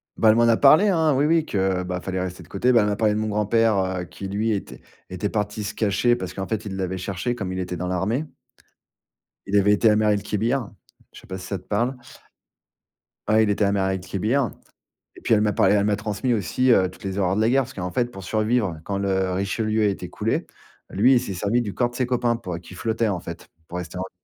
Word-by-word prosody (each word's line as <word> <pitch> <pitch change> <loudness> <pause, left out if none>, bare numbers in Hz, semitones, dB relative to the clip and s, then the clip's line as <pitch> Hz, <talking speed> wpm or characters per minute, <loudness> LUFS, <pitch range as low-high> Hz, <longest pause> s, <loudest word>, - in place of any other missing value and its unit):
Bah, 110 - +4
elle 110 - +6
m'en 120 0 +4
a 115 -1 +4
parlé, 155 +9 +6
hein. 160 -6 +3
Oui, 140 +3 +2
oui 160 0 +3
que, 95 -5 0
bah 90 0 -4
fallait 95 0 -3
rester 90 0 -5
de 85 - -14
côté. 120 +6 +1
Bah, 120 -2 +5
elle 105 - +1
m'a 105 - 0
parlé 105 0 +2
de 105 - -1
mon 110 - -1
grand-père, 105 +1 +2
heu, 95 -1 -1
qui 95 - -8
lui 105 +3 -1
était 100 -2 -3 0.3
était 95 - -6
était 100 +3 -2
parti 105 0 -2
se 100 - -4
cacher 110 +3 +2
parce 95 -6 -6
qu'en 95 0 -5
fait 110 0 -3
il 100 -2 -5
l'avait 95 -1 -3
cherché 95 +6 -3
comme 100 -6 -4
il 95 - -3
était 90 -1 -4
dans 90 +2 -3
l'armée. 100 - -1 1.2
Il 100 - +2
avait 100 +1 +4
été 110 +2 +4
à 105 - +4
Mers 105 0 +2
el-Kébir 105 +4 -1 0.4
je - - -13
sais - - -18
pas 95 - -5
si 90 - -9
ça 100 0 -4
te - - -22
parle? 120 +5 0 1.3
Ouais, 110 +1 +5
il 105 - +1
était 100 +1 +1
à 100 - +2
Mers 95 -1 +1
el-Kébir 100 +7 -1 0.6
et - - -14
puis - - +1
elle 105 - +2
m'a 105 -1 +1
parlé 95 +2 +4
elle 100 -1 +2
m'a 105 -1 +2
transmis 105 +4 -2
aussi 115 +5 +1
heu, 95 -5 +4
toutes 90 - -16
les 95 -1 -4
horreurs 95 -1 +1
de 105 - +1
la 110 - +3
guerre. 135 +2 +3
Parce 130 +1 -11
qu'en 90 -1 -4
fait 120 +6 +1
pour 95 -4 -9
survivre, 110 -3 0
quand 100 +2 -3
le 95 -1 0
Richelieu 110 +3 0
a - - +4
été 100 -2 -2
coulé, - - -2 0.4
lui 115 +8 +4
il - - +5
s'est 120 -5 -5
servi 105 +6 +1
du 105 -4 -4
corps 120 -1 +1
de 120 - -14
ses 130 - 0
copains 120 -1 +1
pour 90 -7 -5
qu'il 90 +2 -13
flottait 115 +2 0
en 95 - -1
fait, 85 0 -9 0.2
pour 90 - -6
rester 90 0 -6
en - - -2
v 95 - -5
105 Hz, 260 wpm, -23 LUFS, 95-115 Hz, 1.3 s, elle